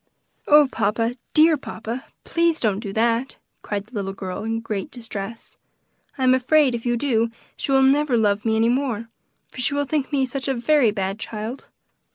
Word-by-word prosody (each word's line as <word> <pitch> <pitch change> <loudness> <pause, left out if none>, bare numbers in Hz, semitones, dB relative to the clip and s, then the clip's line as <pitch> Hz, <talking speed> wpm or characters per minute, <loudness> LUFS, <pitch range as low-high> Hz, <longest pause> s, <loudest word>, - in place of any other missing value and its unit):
"Oh, 295 -1 +7
papa! 225 +4 0 0.2
dear 315 0 +6
papa! 235 -1 -6 0.2
please 335 -1 +1
don't 205 -4 +1
do 205 -3 -5
that!" 230 +4 0 0.2
cried 205 -1 -4
the 230 - -25
little 195 -3 -3
girl 190 0 -5
in 225 +1 -2
great 220 +2 -4
distress. 225 -3 -7 0.6
"I 265 - -2
am 255 0 +5
afraid 265 +1 +3
if 235 +1 -4
you 240 0 +1
do 230 -3 +1 0.3
she - - -3
will 270 0 +5
never 275 -1 +3
love 210 -2 +2
me 220 -1 +1
any 225 +1 +3
more, 240 -3 -1 0.4
for 255 - -6
she 280 - +1
will 285 0 0
think 285 0 -1
me 275 -2 +2
such 265 +2 -4
a 270 - 0
very 245 +1 +3
bad 195 0 -2
child." 220 +4 -6
235 Hz, 190 wpm, -23 LUFS, 220-275 Hz, 0.6 s, Oh